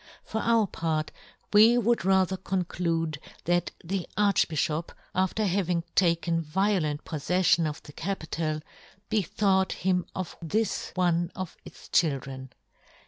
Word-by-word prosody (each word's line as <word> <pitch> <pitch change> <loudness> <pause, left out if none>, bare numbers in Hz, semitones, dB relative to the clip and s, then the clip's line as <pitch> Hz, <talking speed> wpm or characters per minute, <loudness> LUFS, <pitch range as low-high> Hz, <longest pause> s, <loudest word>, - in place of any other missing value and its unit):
For 220 - -3
our 230 -2 +3
part 160 -4 -2 0.4
we 220 +3 +7
would 235 -3 +2
rather 190 0 +3
conclude 170 -4 -1 0.3
that 175 0 +2
the 185 +1 -3
Archbi{hop, 165 -5 +1 0.2
after 190 +4 +1
having 180 -3 +1
taken 170 -2 +2
vio 190 +6 +1
lent 150 -2 -3
poffeffion 170 +1 +2
of 150 - -8
the 145 - -12
capital, 160 -4 -3 0.5
be 220 -1 +2
thought 190 +1 +1
him 180 -1 0
of 185 -2 -4
this 210 +7 -1
one 175 -1 +1
of 185 -3 -5
its - - -13
chil 160 -6 +3
dren. 130 0 -8
180 Hz, 135 wpm, -28 LUFS, 160-195 Hz, 0.5 s, we